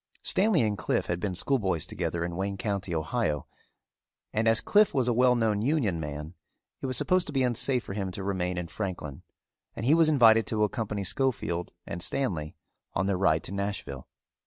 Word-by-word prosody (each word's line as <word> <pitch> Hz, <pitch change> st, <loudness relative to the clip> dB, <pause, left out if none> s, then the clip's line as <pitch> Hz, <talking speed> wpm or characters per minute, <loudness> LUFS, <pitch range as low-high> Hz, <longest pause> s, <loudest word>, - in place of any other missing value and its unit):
Stanley 190 Hz, -, +3 dB
and 105 Hz, -3 st, -1 dB
Cliffe 80 Hz, -, 0 dB
had 85 Hz, 0 st, -2 dB
been 95 Hz, -1 st, -2 dB
schoolboys 95 Hz, -, 0 dB
together 85 Hz, 0 st, -3 dB
in 85 Hz, 0 st, -5 dB
Wayne 95 Hz, +1 st, -2 dB
County, 95 Hz, -3 st, -2 dB
Ohio, 80 Hz, -, -1 dB, 0.9 s
and 110 Hz, +1 st, +1 dB
as 115 Hz, 0 st, +5 dB
Cliffe 210 Hz, 0 st, +3 dB
was 130 Hz, -3 st, +2 dB
a 120 Hz, -, +3 dB
well 125 Hz, +1 st, +4 dB
known 110 Hz, -3 st, +1 dB
Union 115 Hz, -, +1 dB
man, 75 Hz, +1 st, -6 dB, 0.5 s
it -, -, -2 dB
was 130 Hz, -, +1 dB
supposed 185 Hz, -1 st, +2 dB
to -, -, -5 dB
be 135 Hz, -1 st, +2 dB
unsafe 125 Hz, +1 st, +1 dB
for -, -, -7 dB
him 100 Hz, -2 st, -2 dB
to 95 Hz, -, -5 dB
remain 90 Hz, -2 st, -1 dB
in 90 Hz, -1 st, -3 dB
Franklin 85 Hz, -8 st, -5 dB, 0.5 s
and 115 Hz, -, -4 dB
he 140 Hz, -, +5 dB
was 165 Hz, -1 st, +5 dB
invited 115 Hz, -7 st, +5 dB
to 110 Hz, -1 st, +1 dB
accompany 105 Hz, -1 st, -2 dB
Schofield 95 Hz, -6 st, -1 dB, 0.2 s
and 85 Hz, -, -6 dB
Stanley 85 Hz, -, -2 dB, 0.4 s
on 95 Hz, -, +1 dB
their 100 Hz, -1 st, +1 dB
ride 80 Hz, -4 st, +2 dB
to -, -, -7 dB
Nashville. 100 Hz, -9 st, -4 dB
100 Hz, 190 wpm, -28 LUFS, 90-125 Hz, 0.9 s, as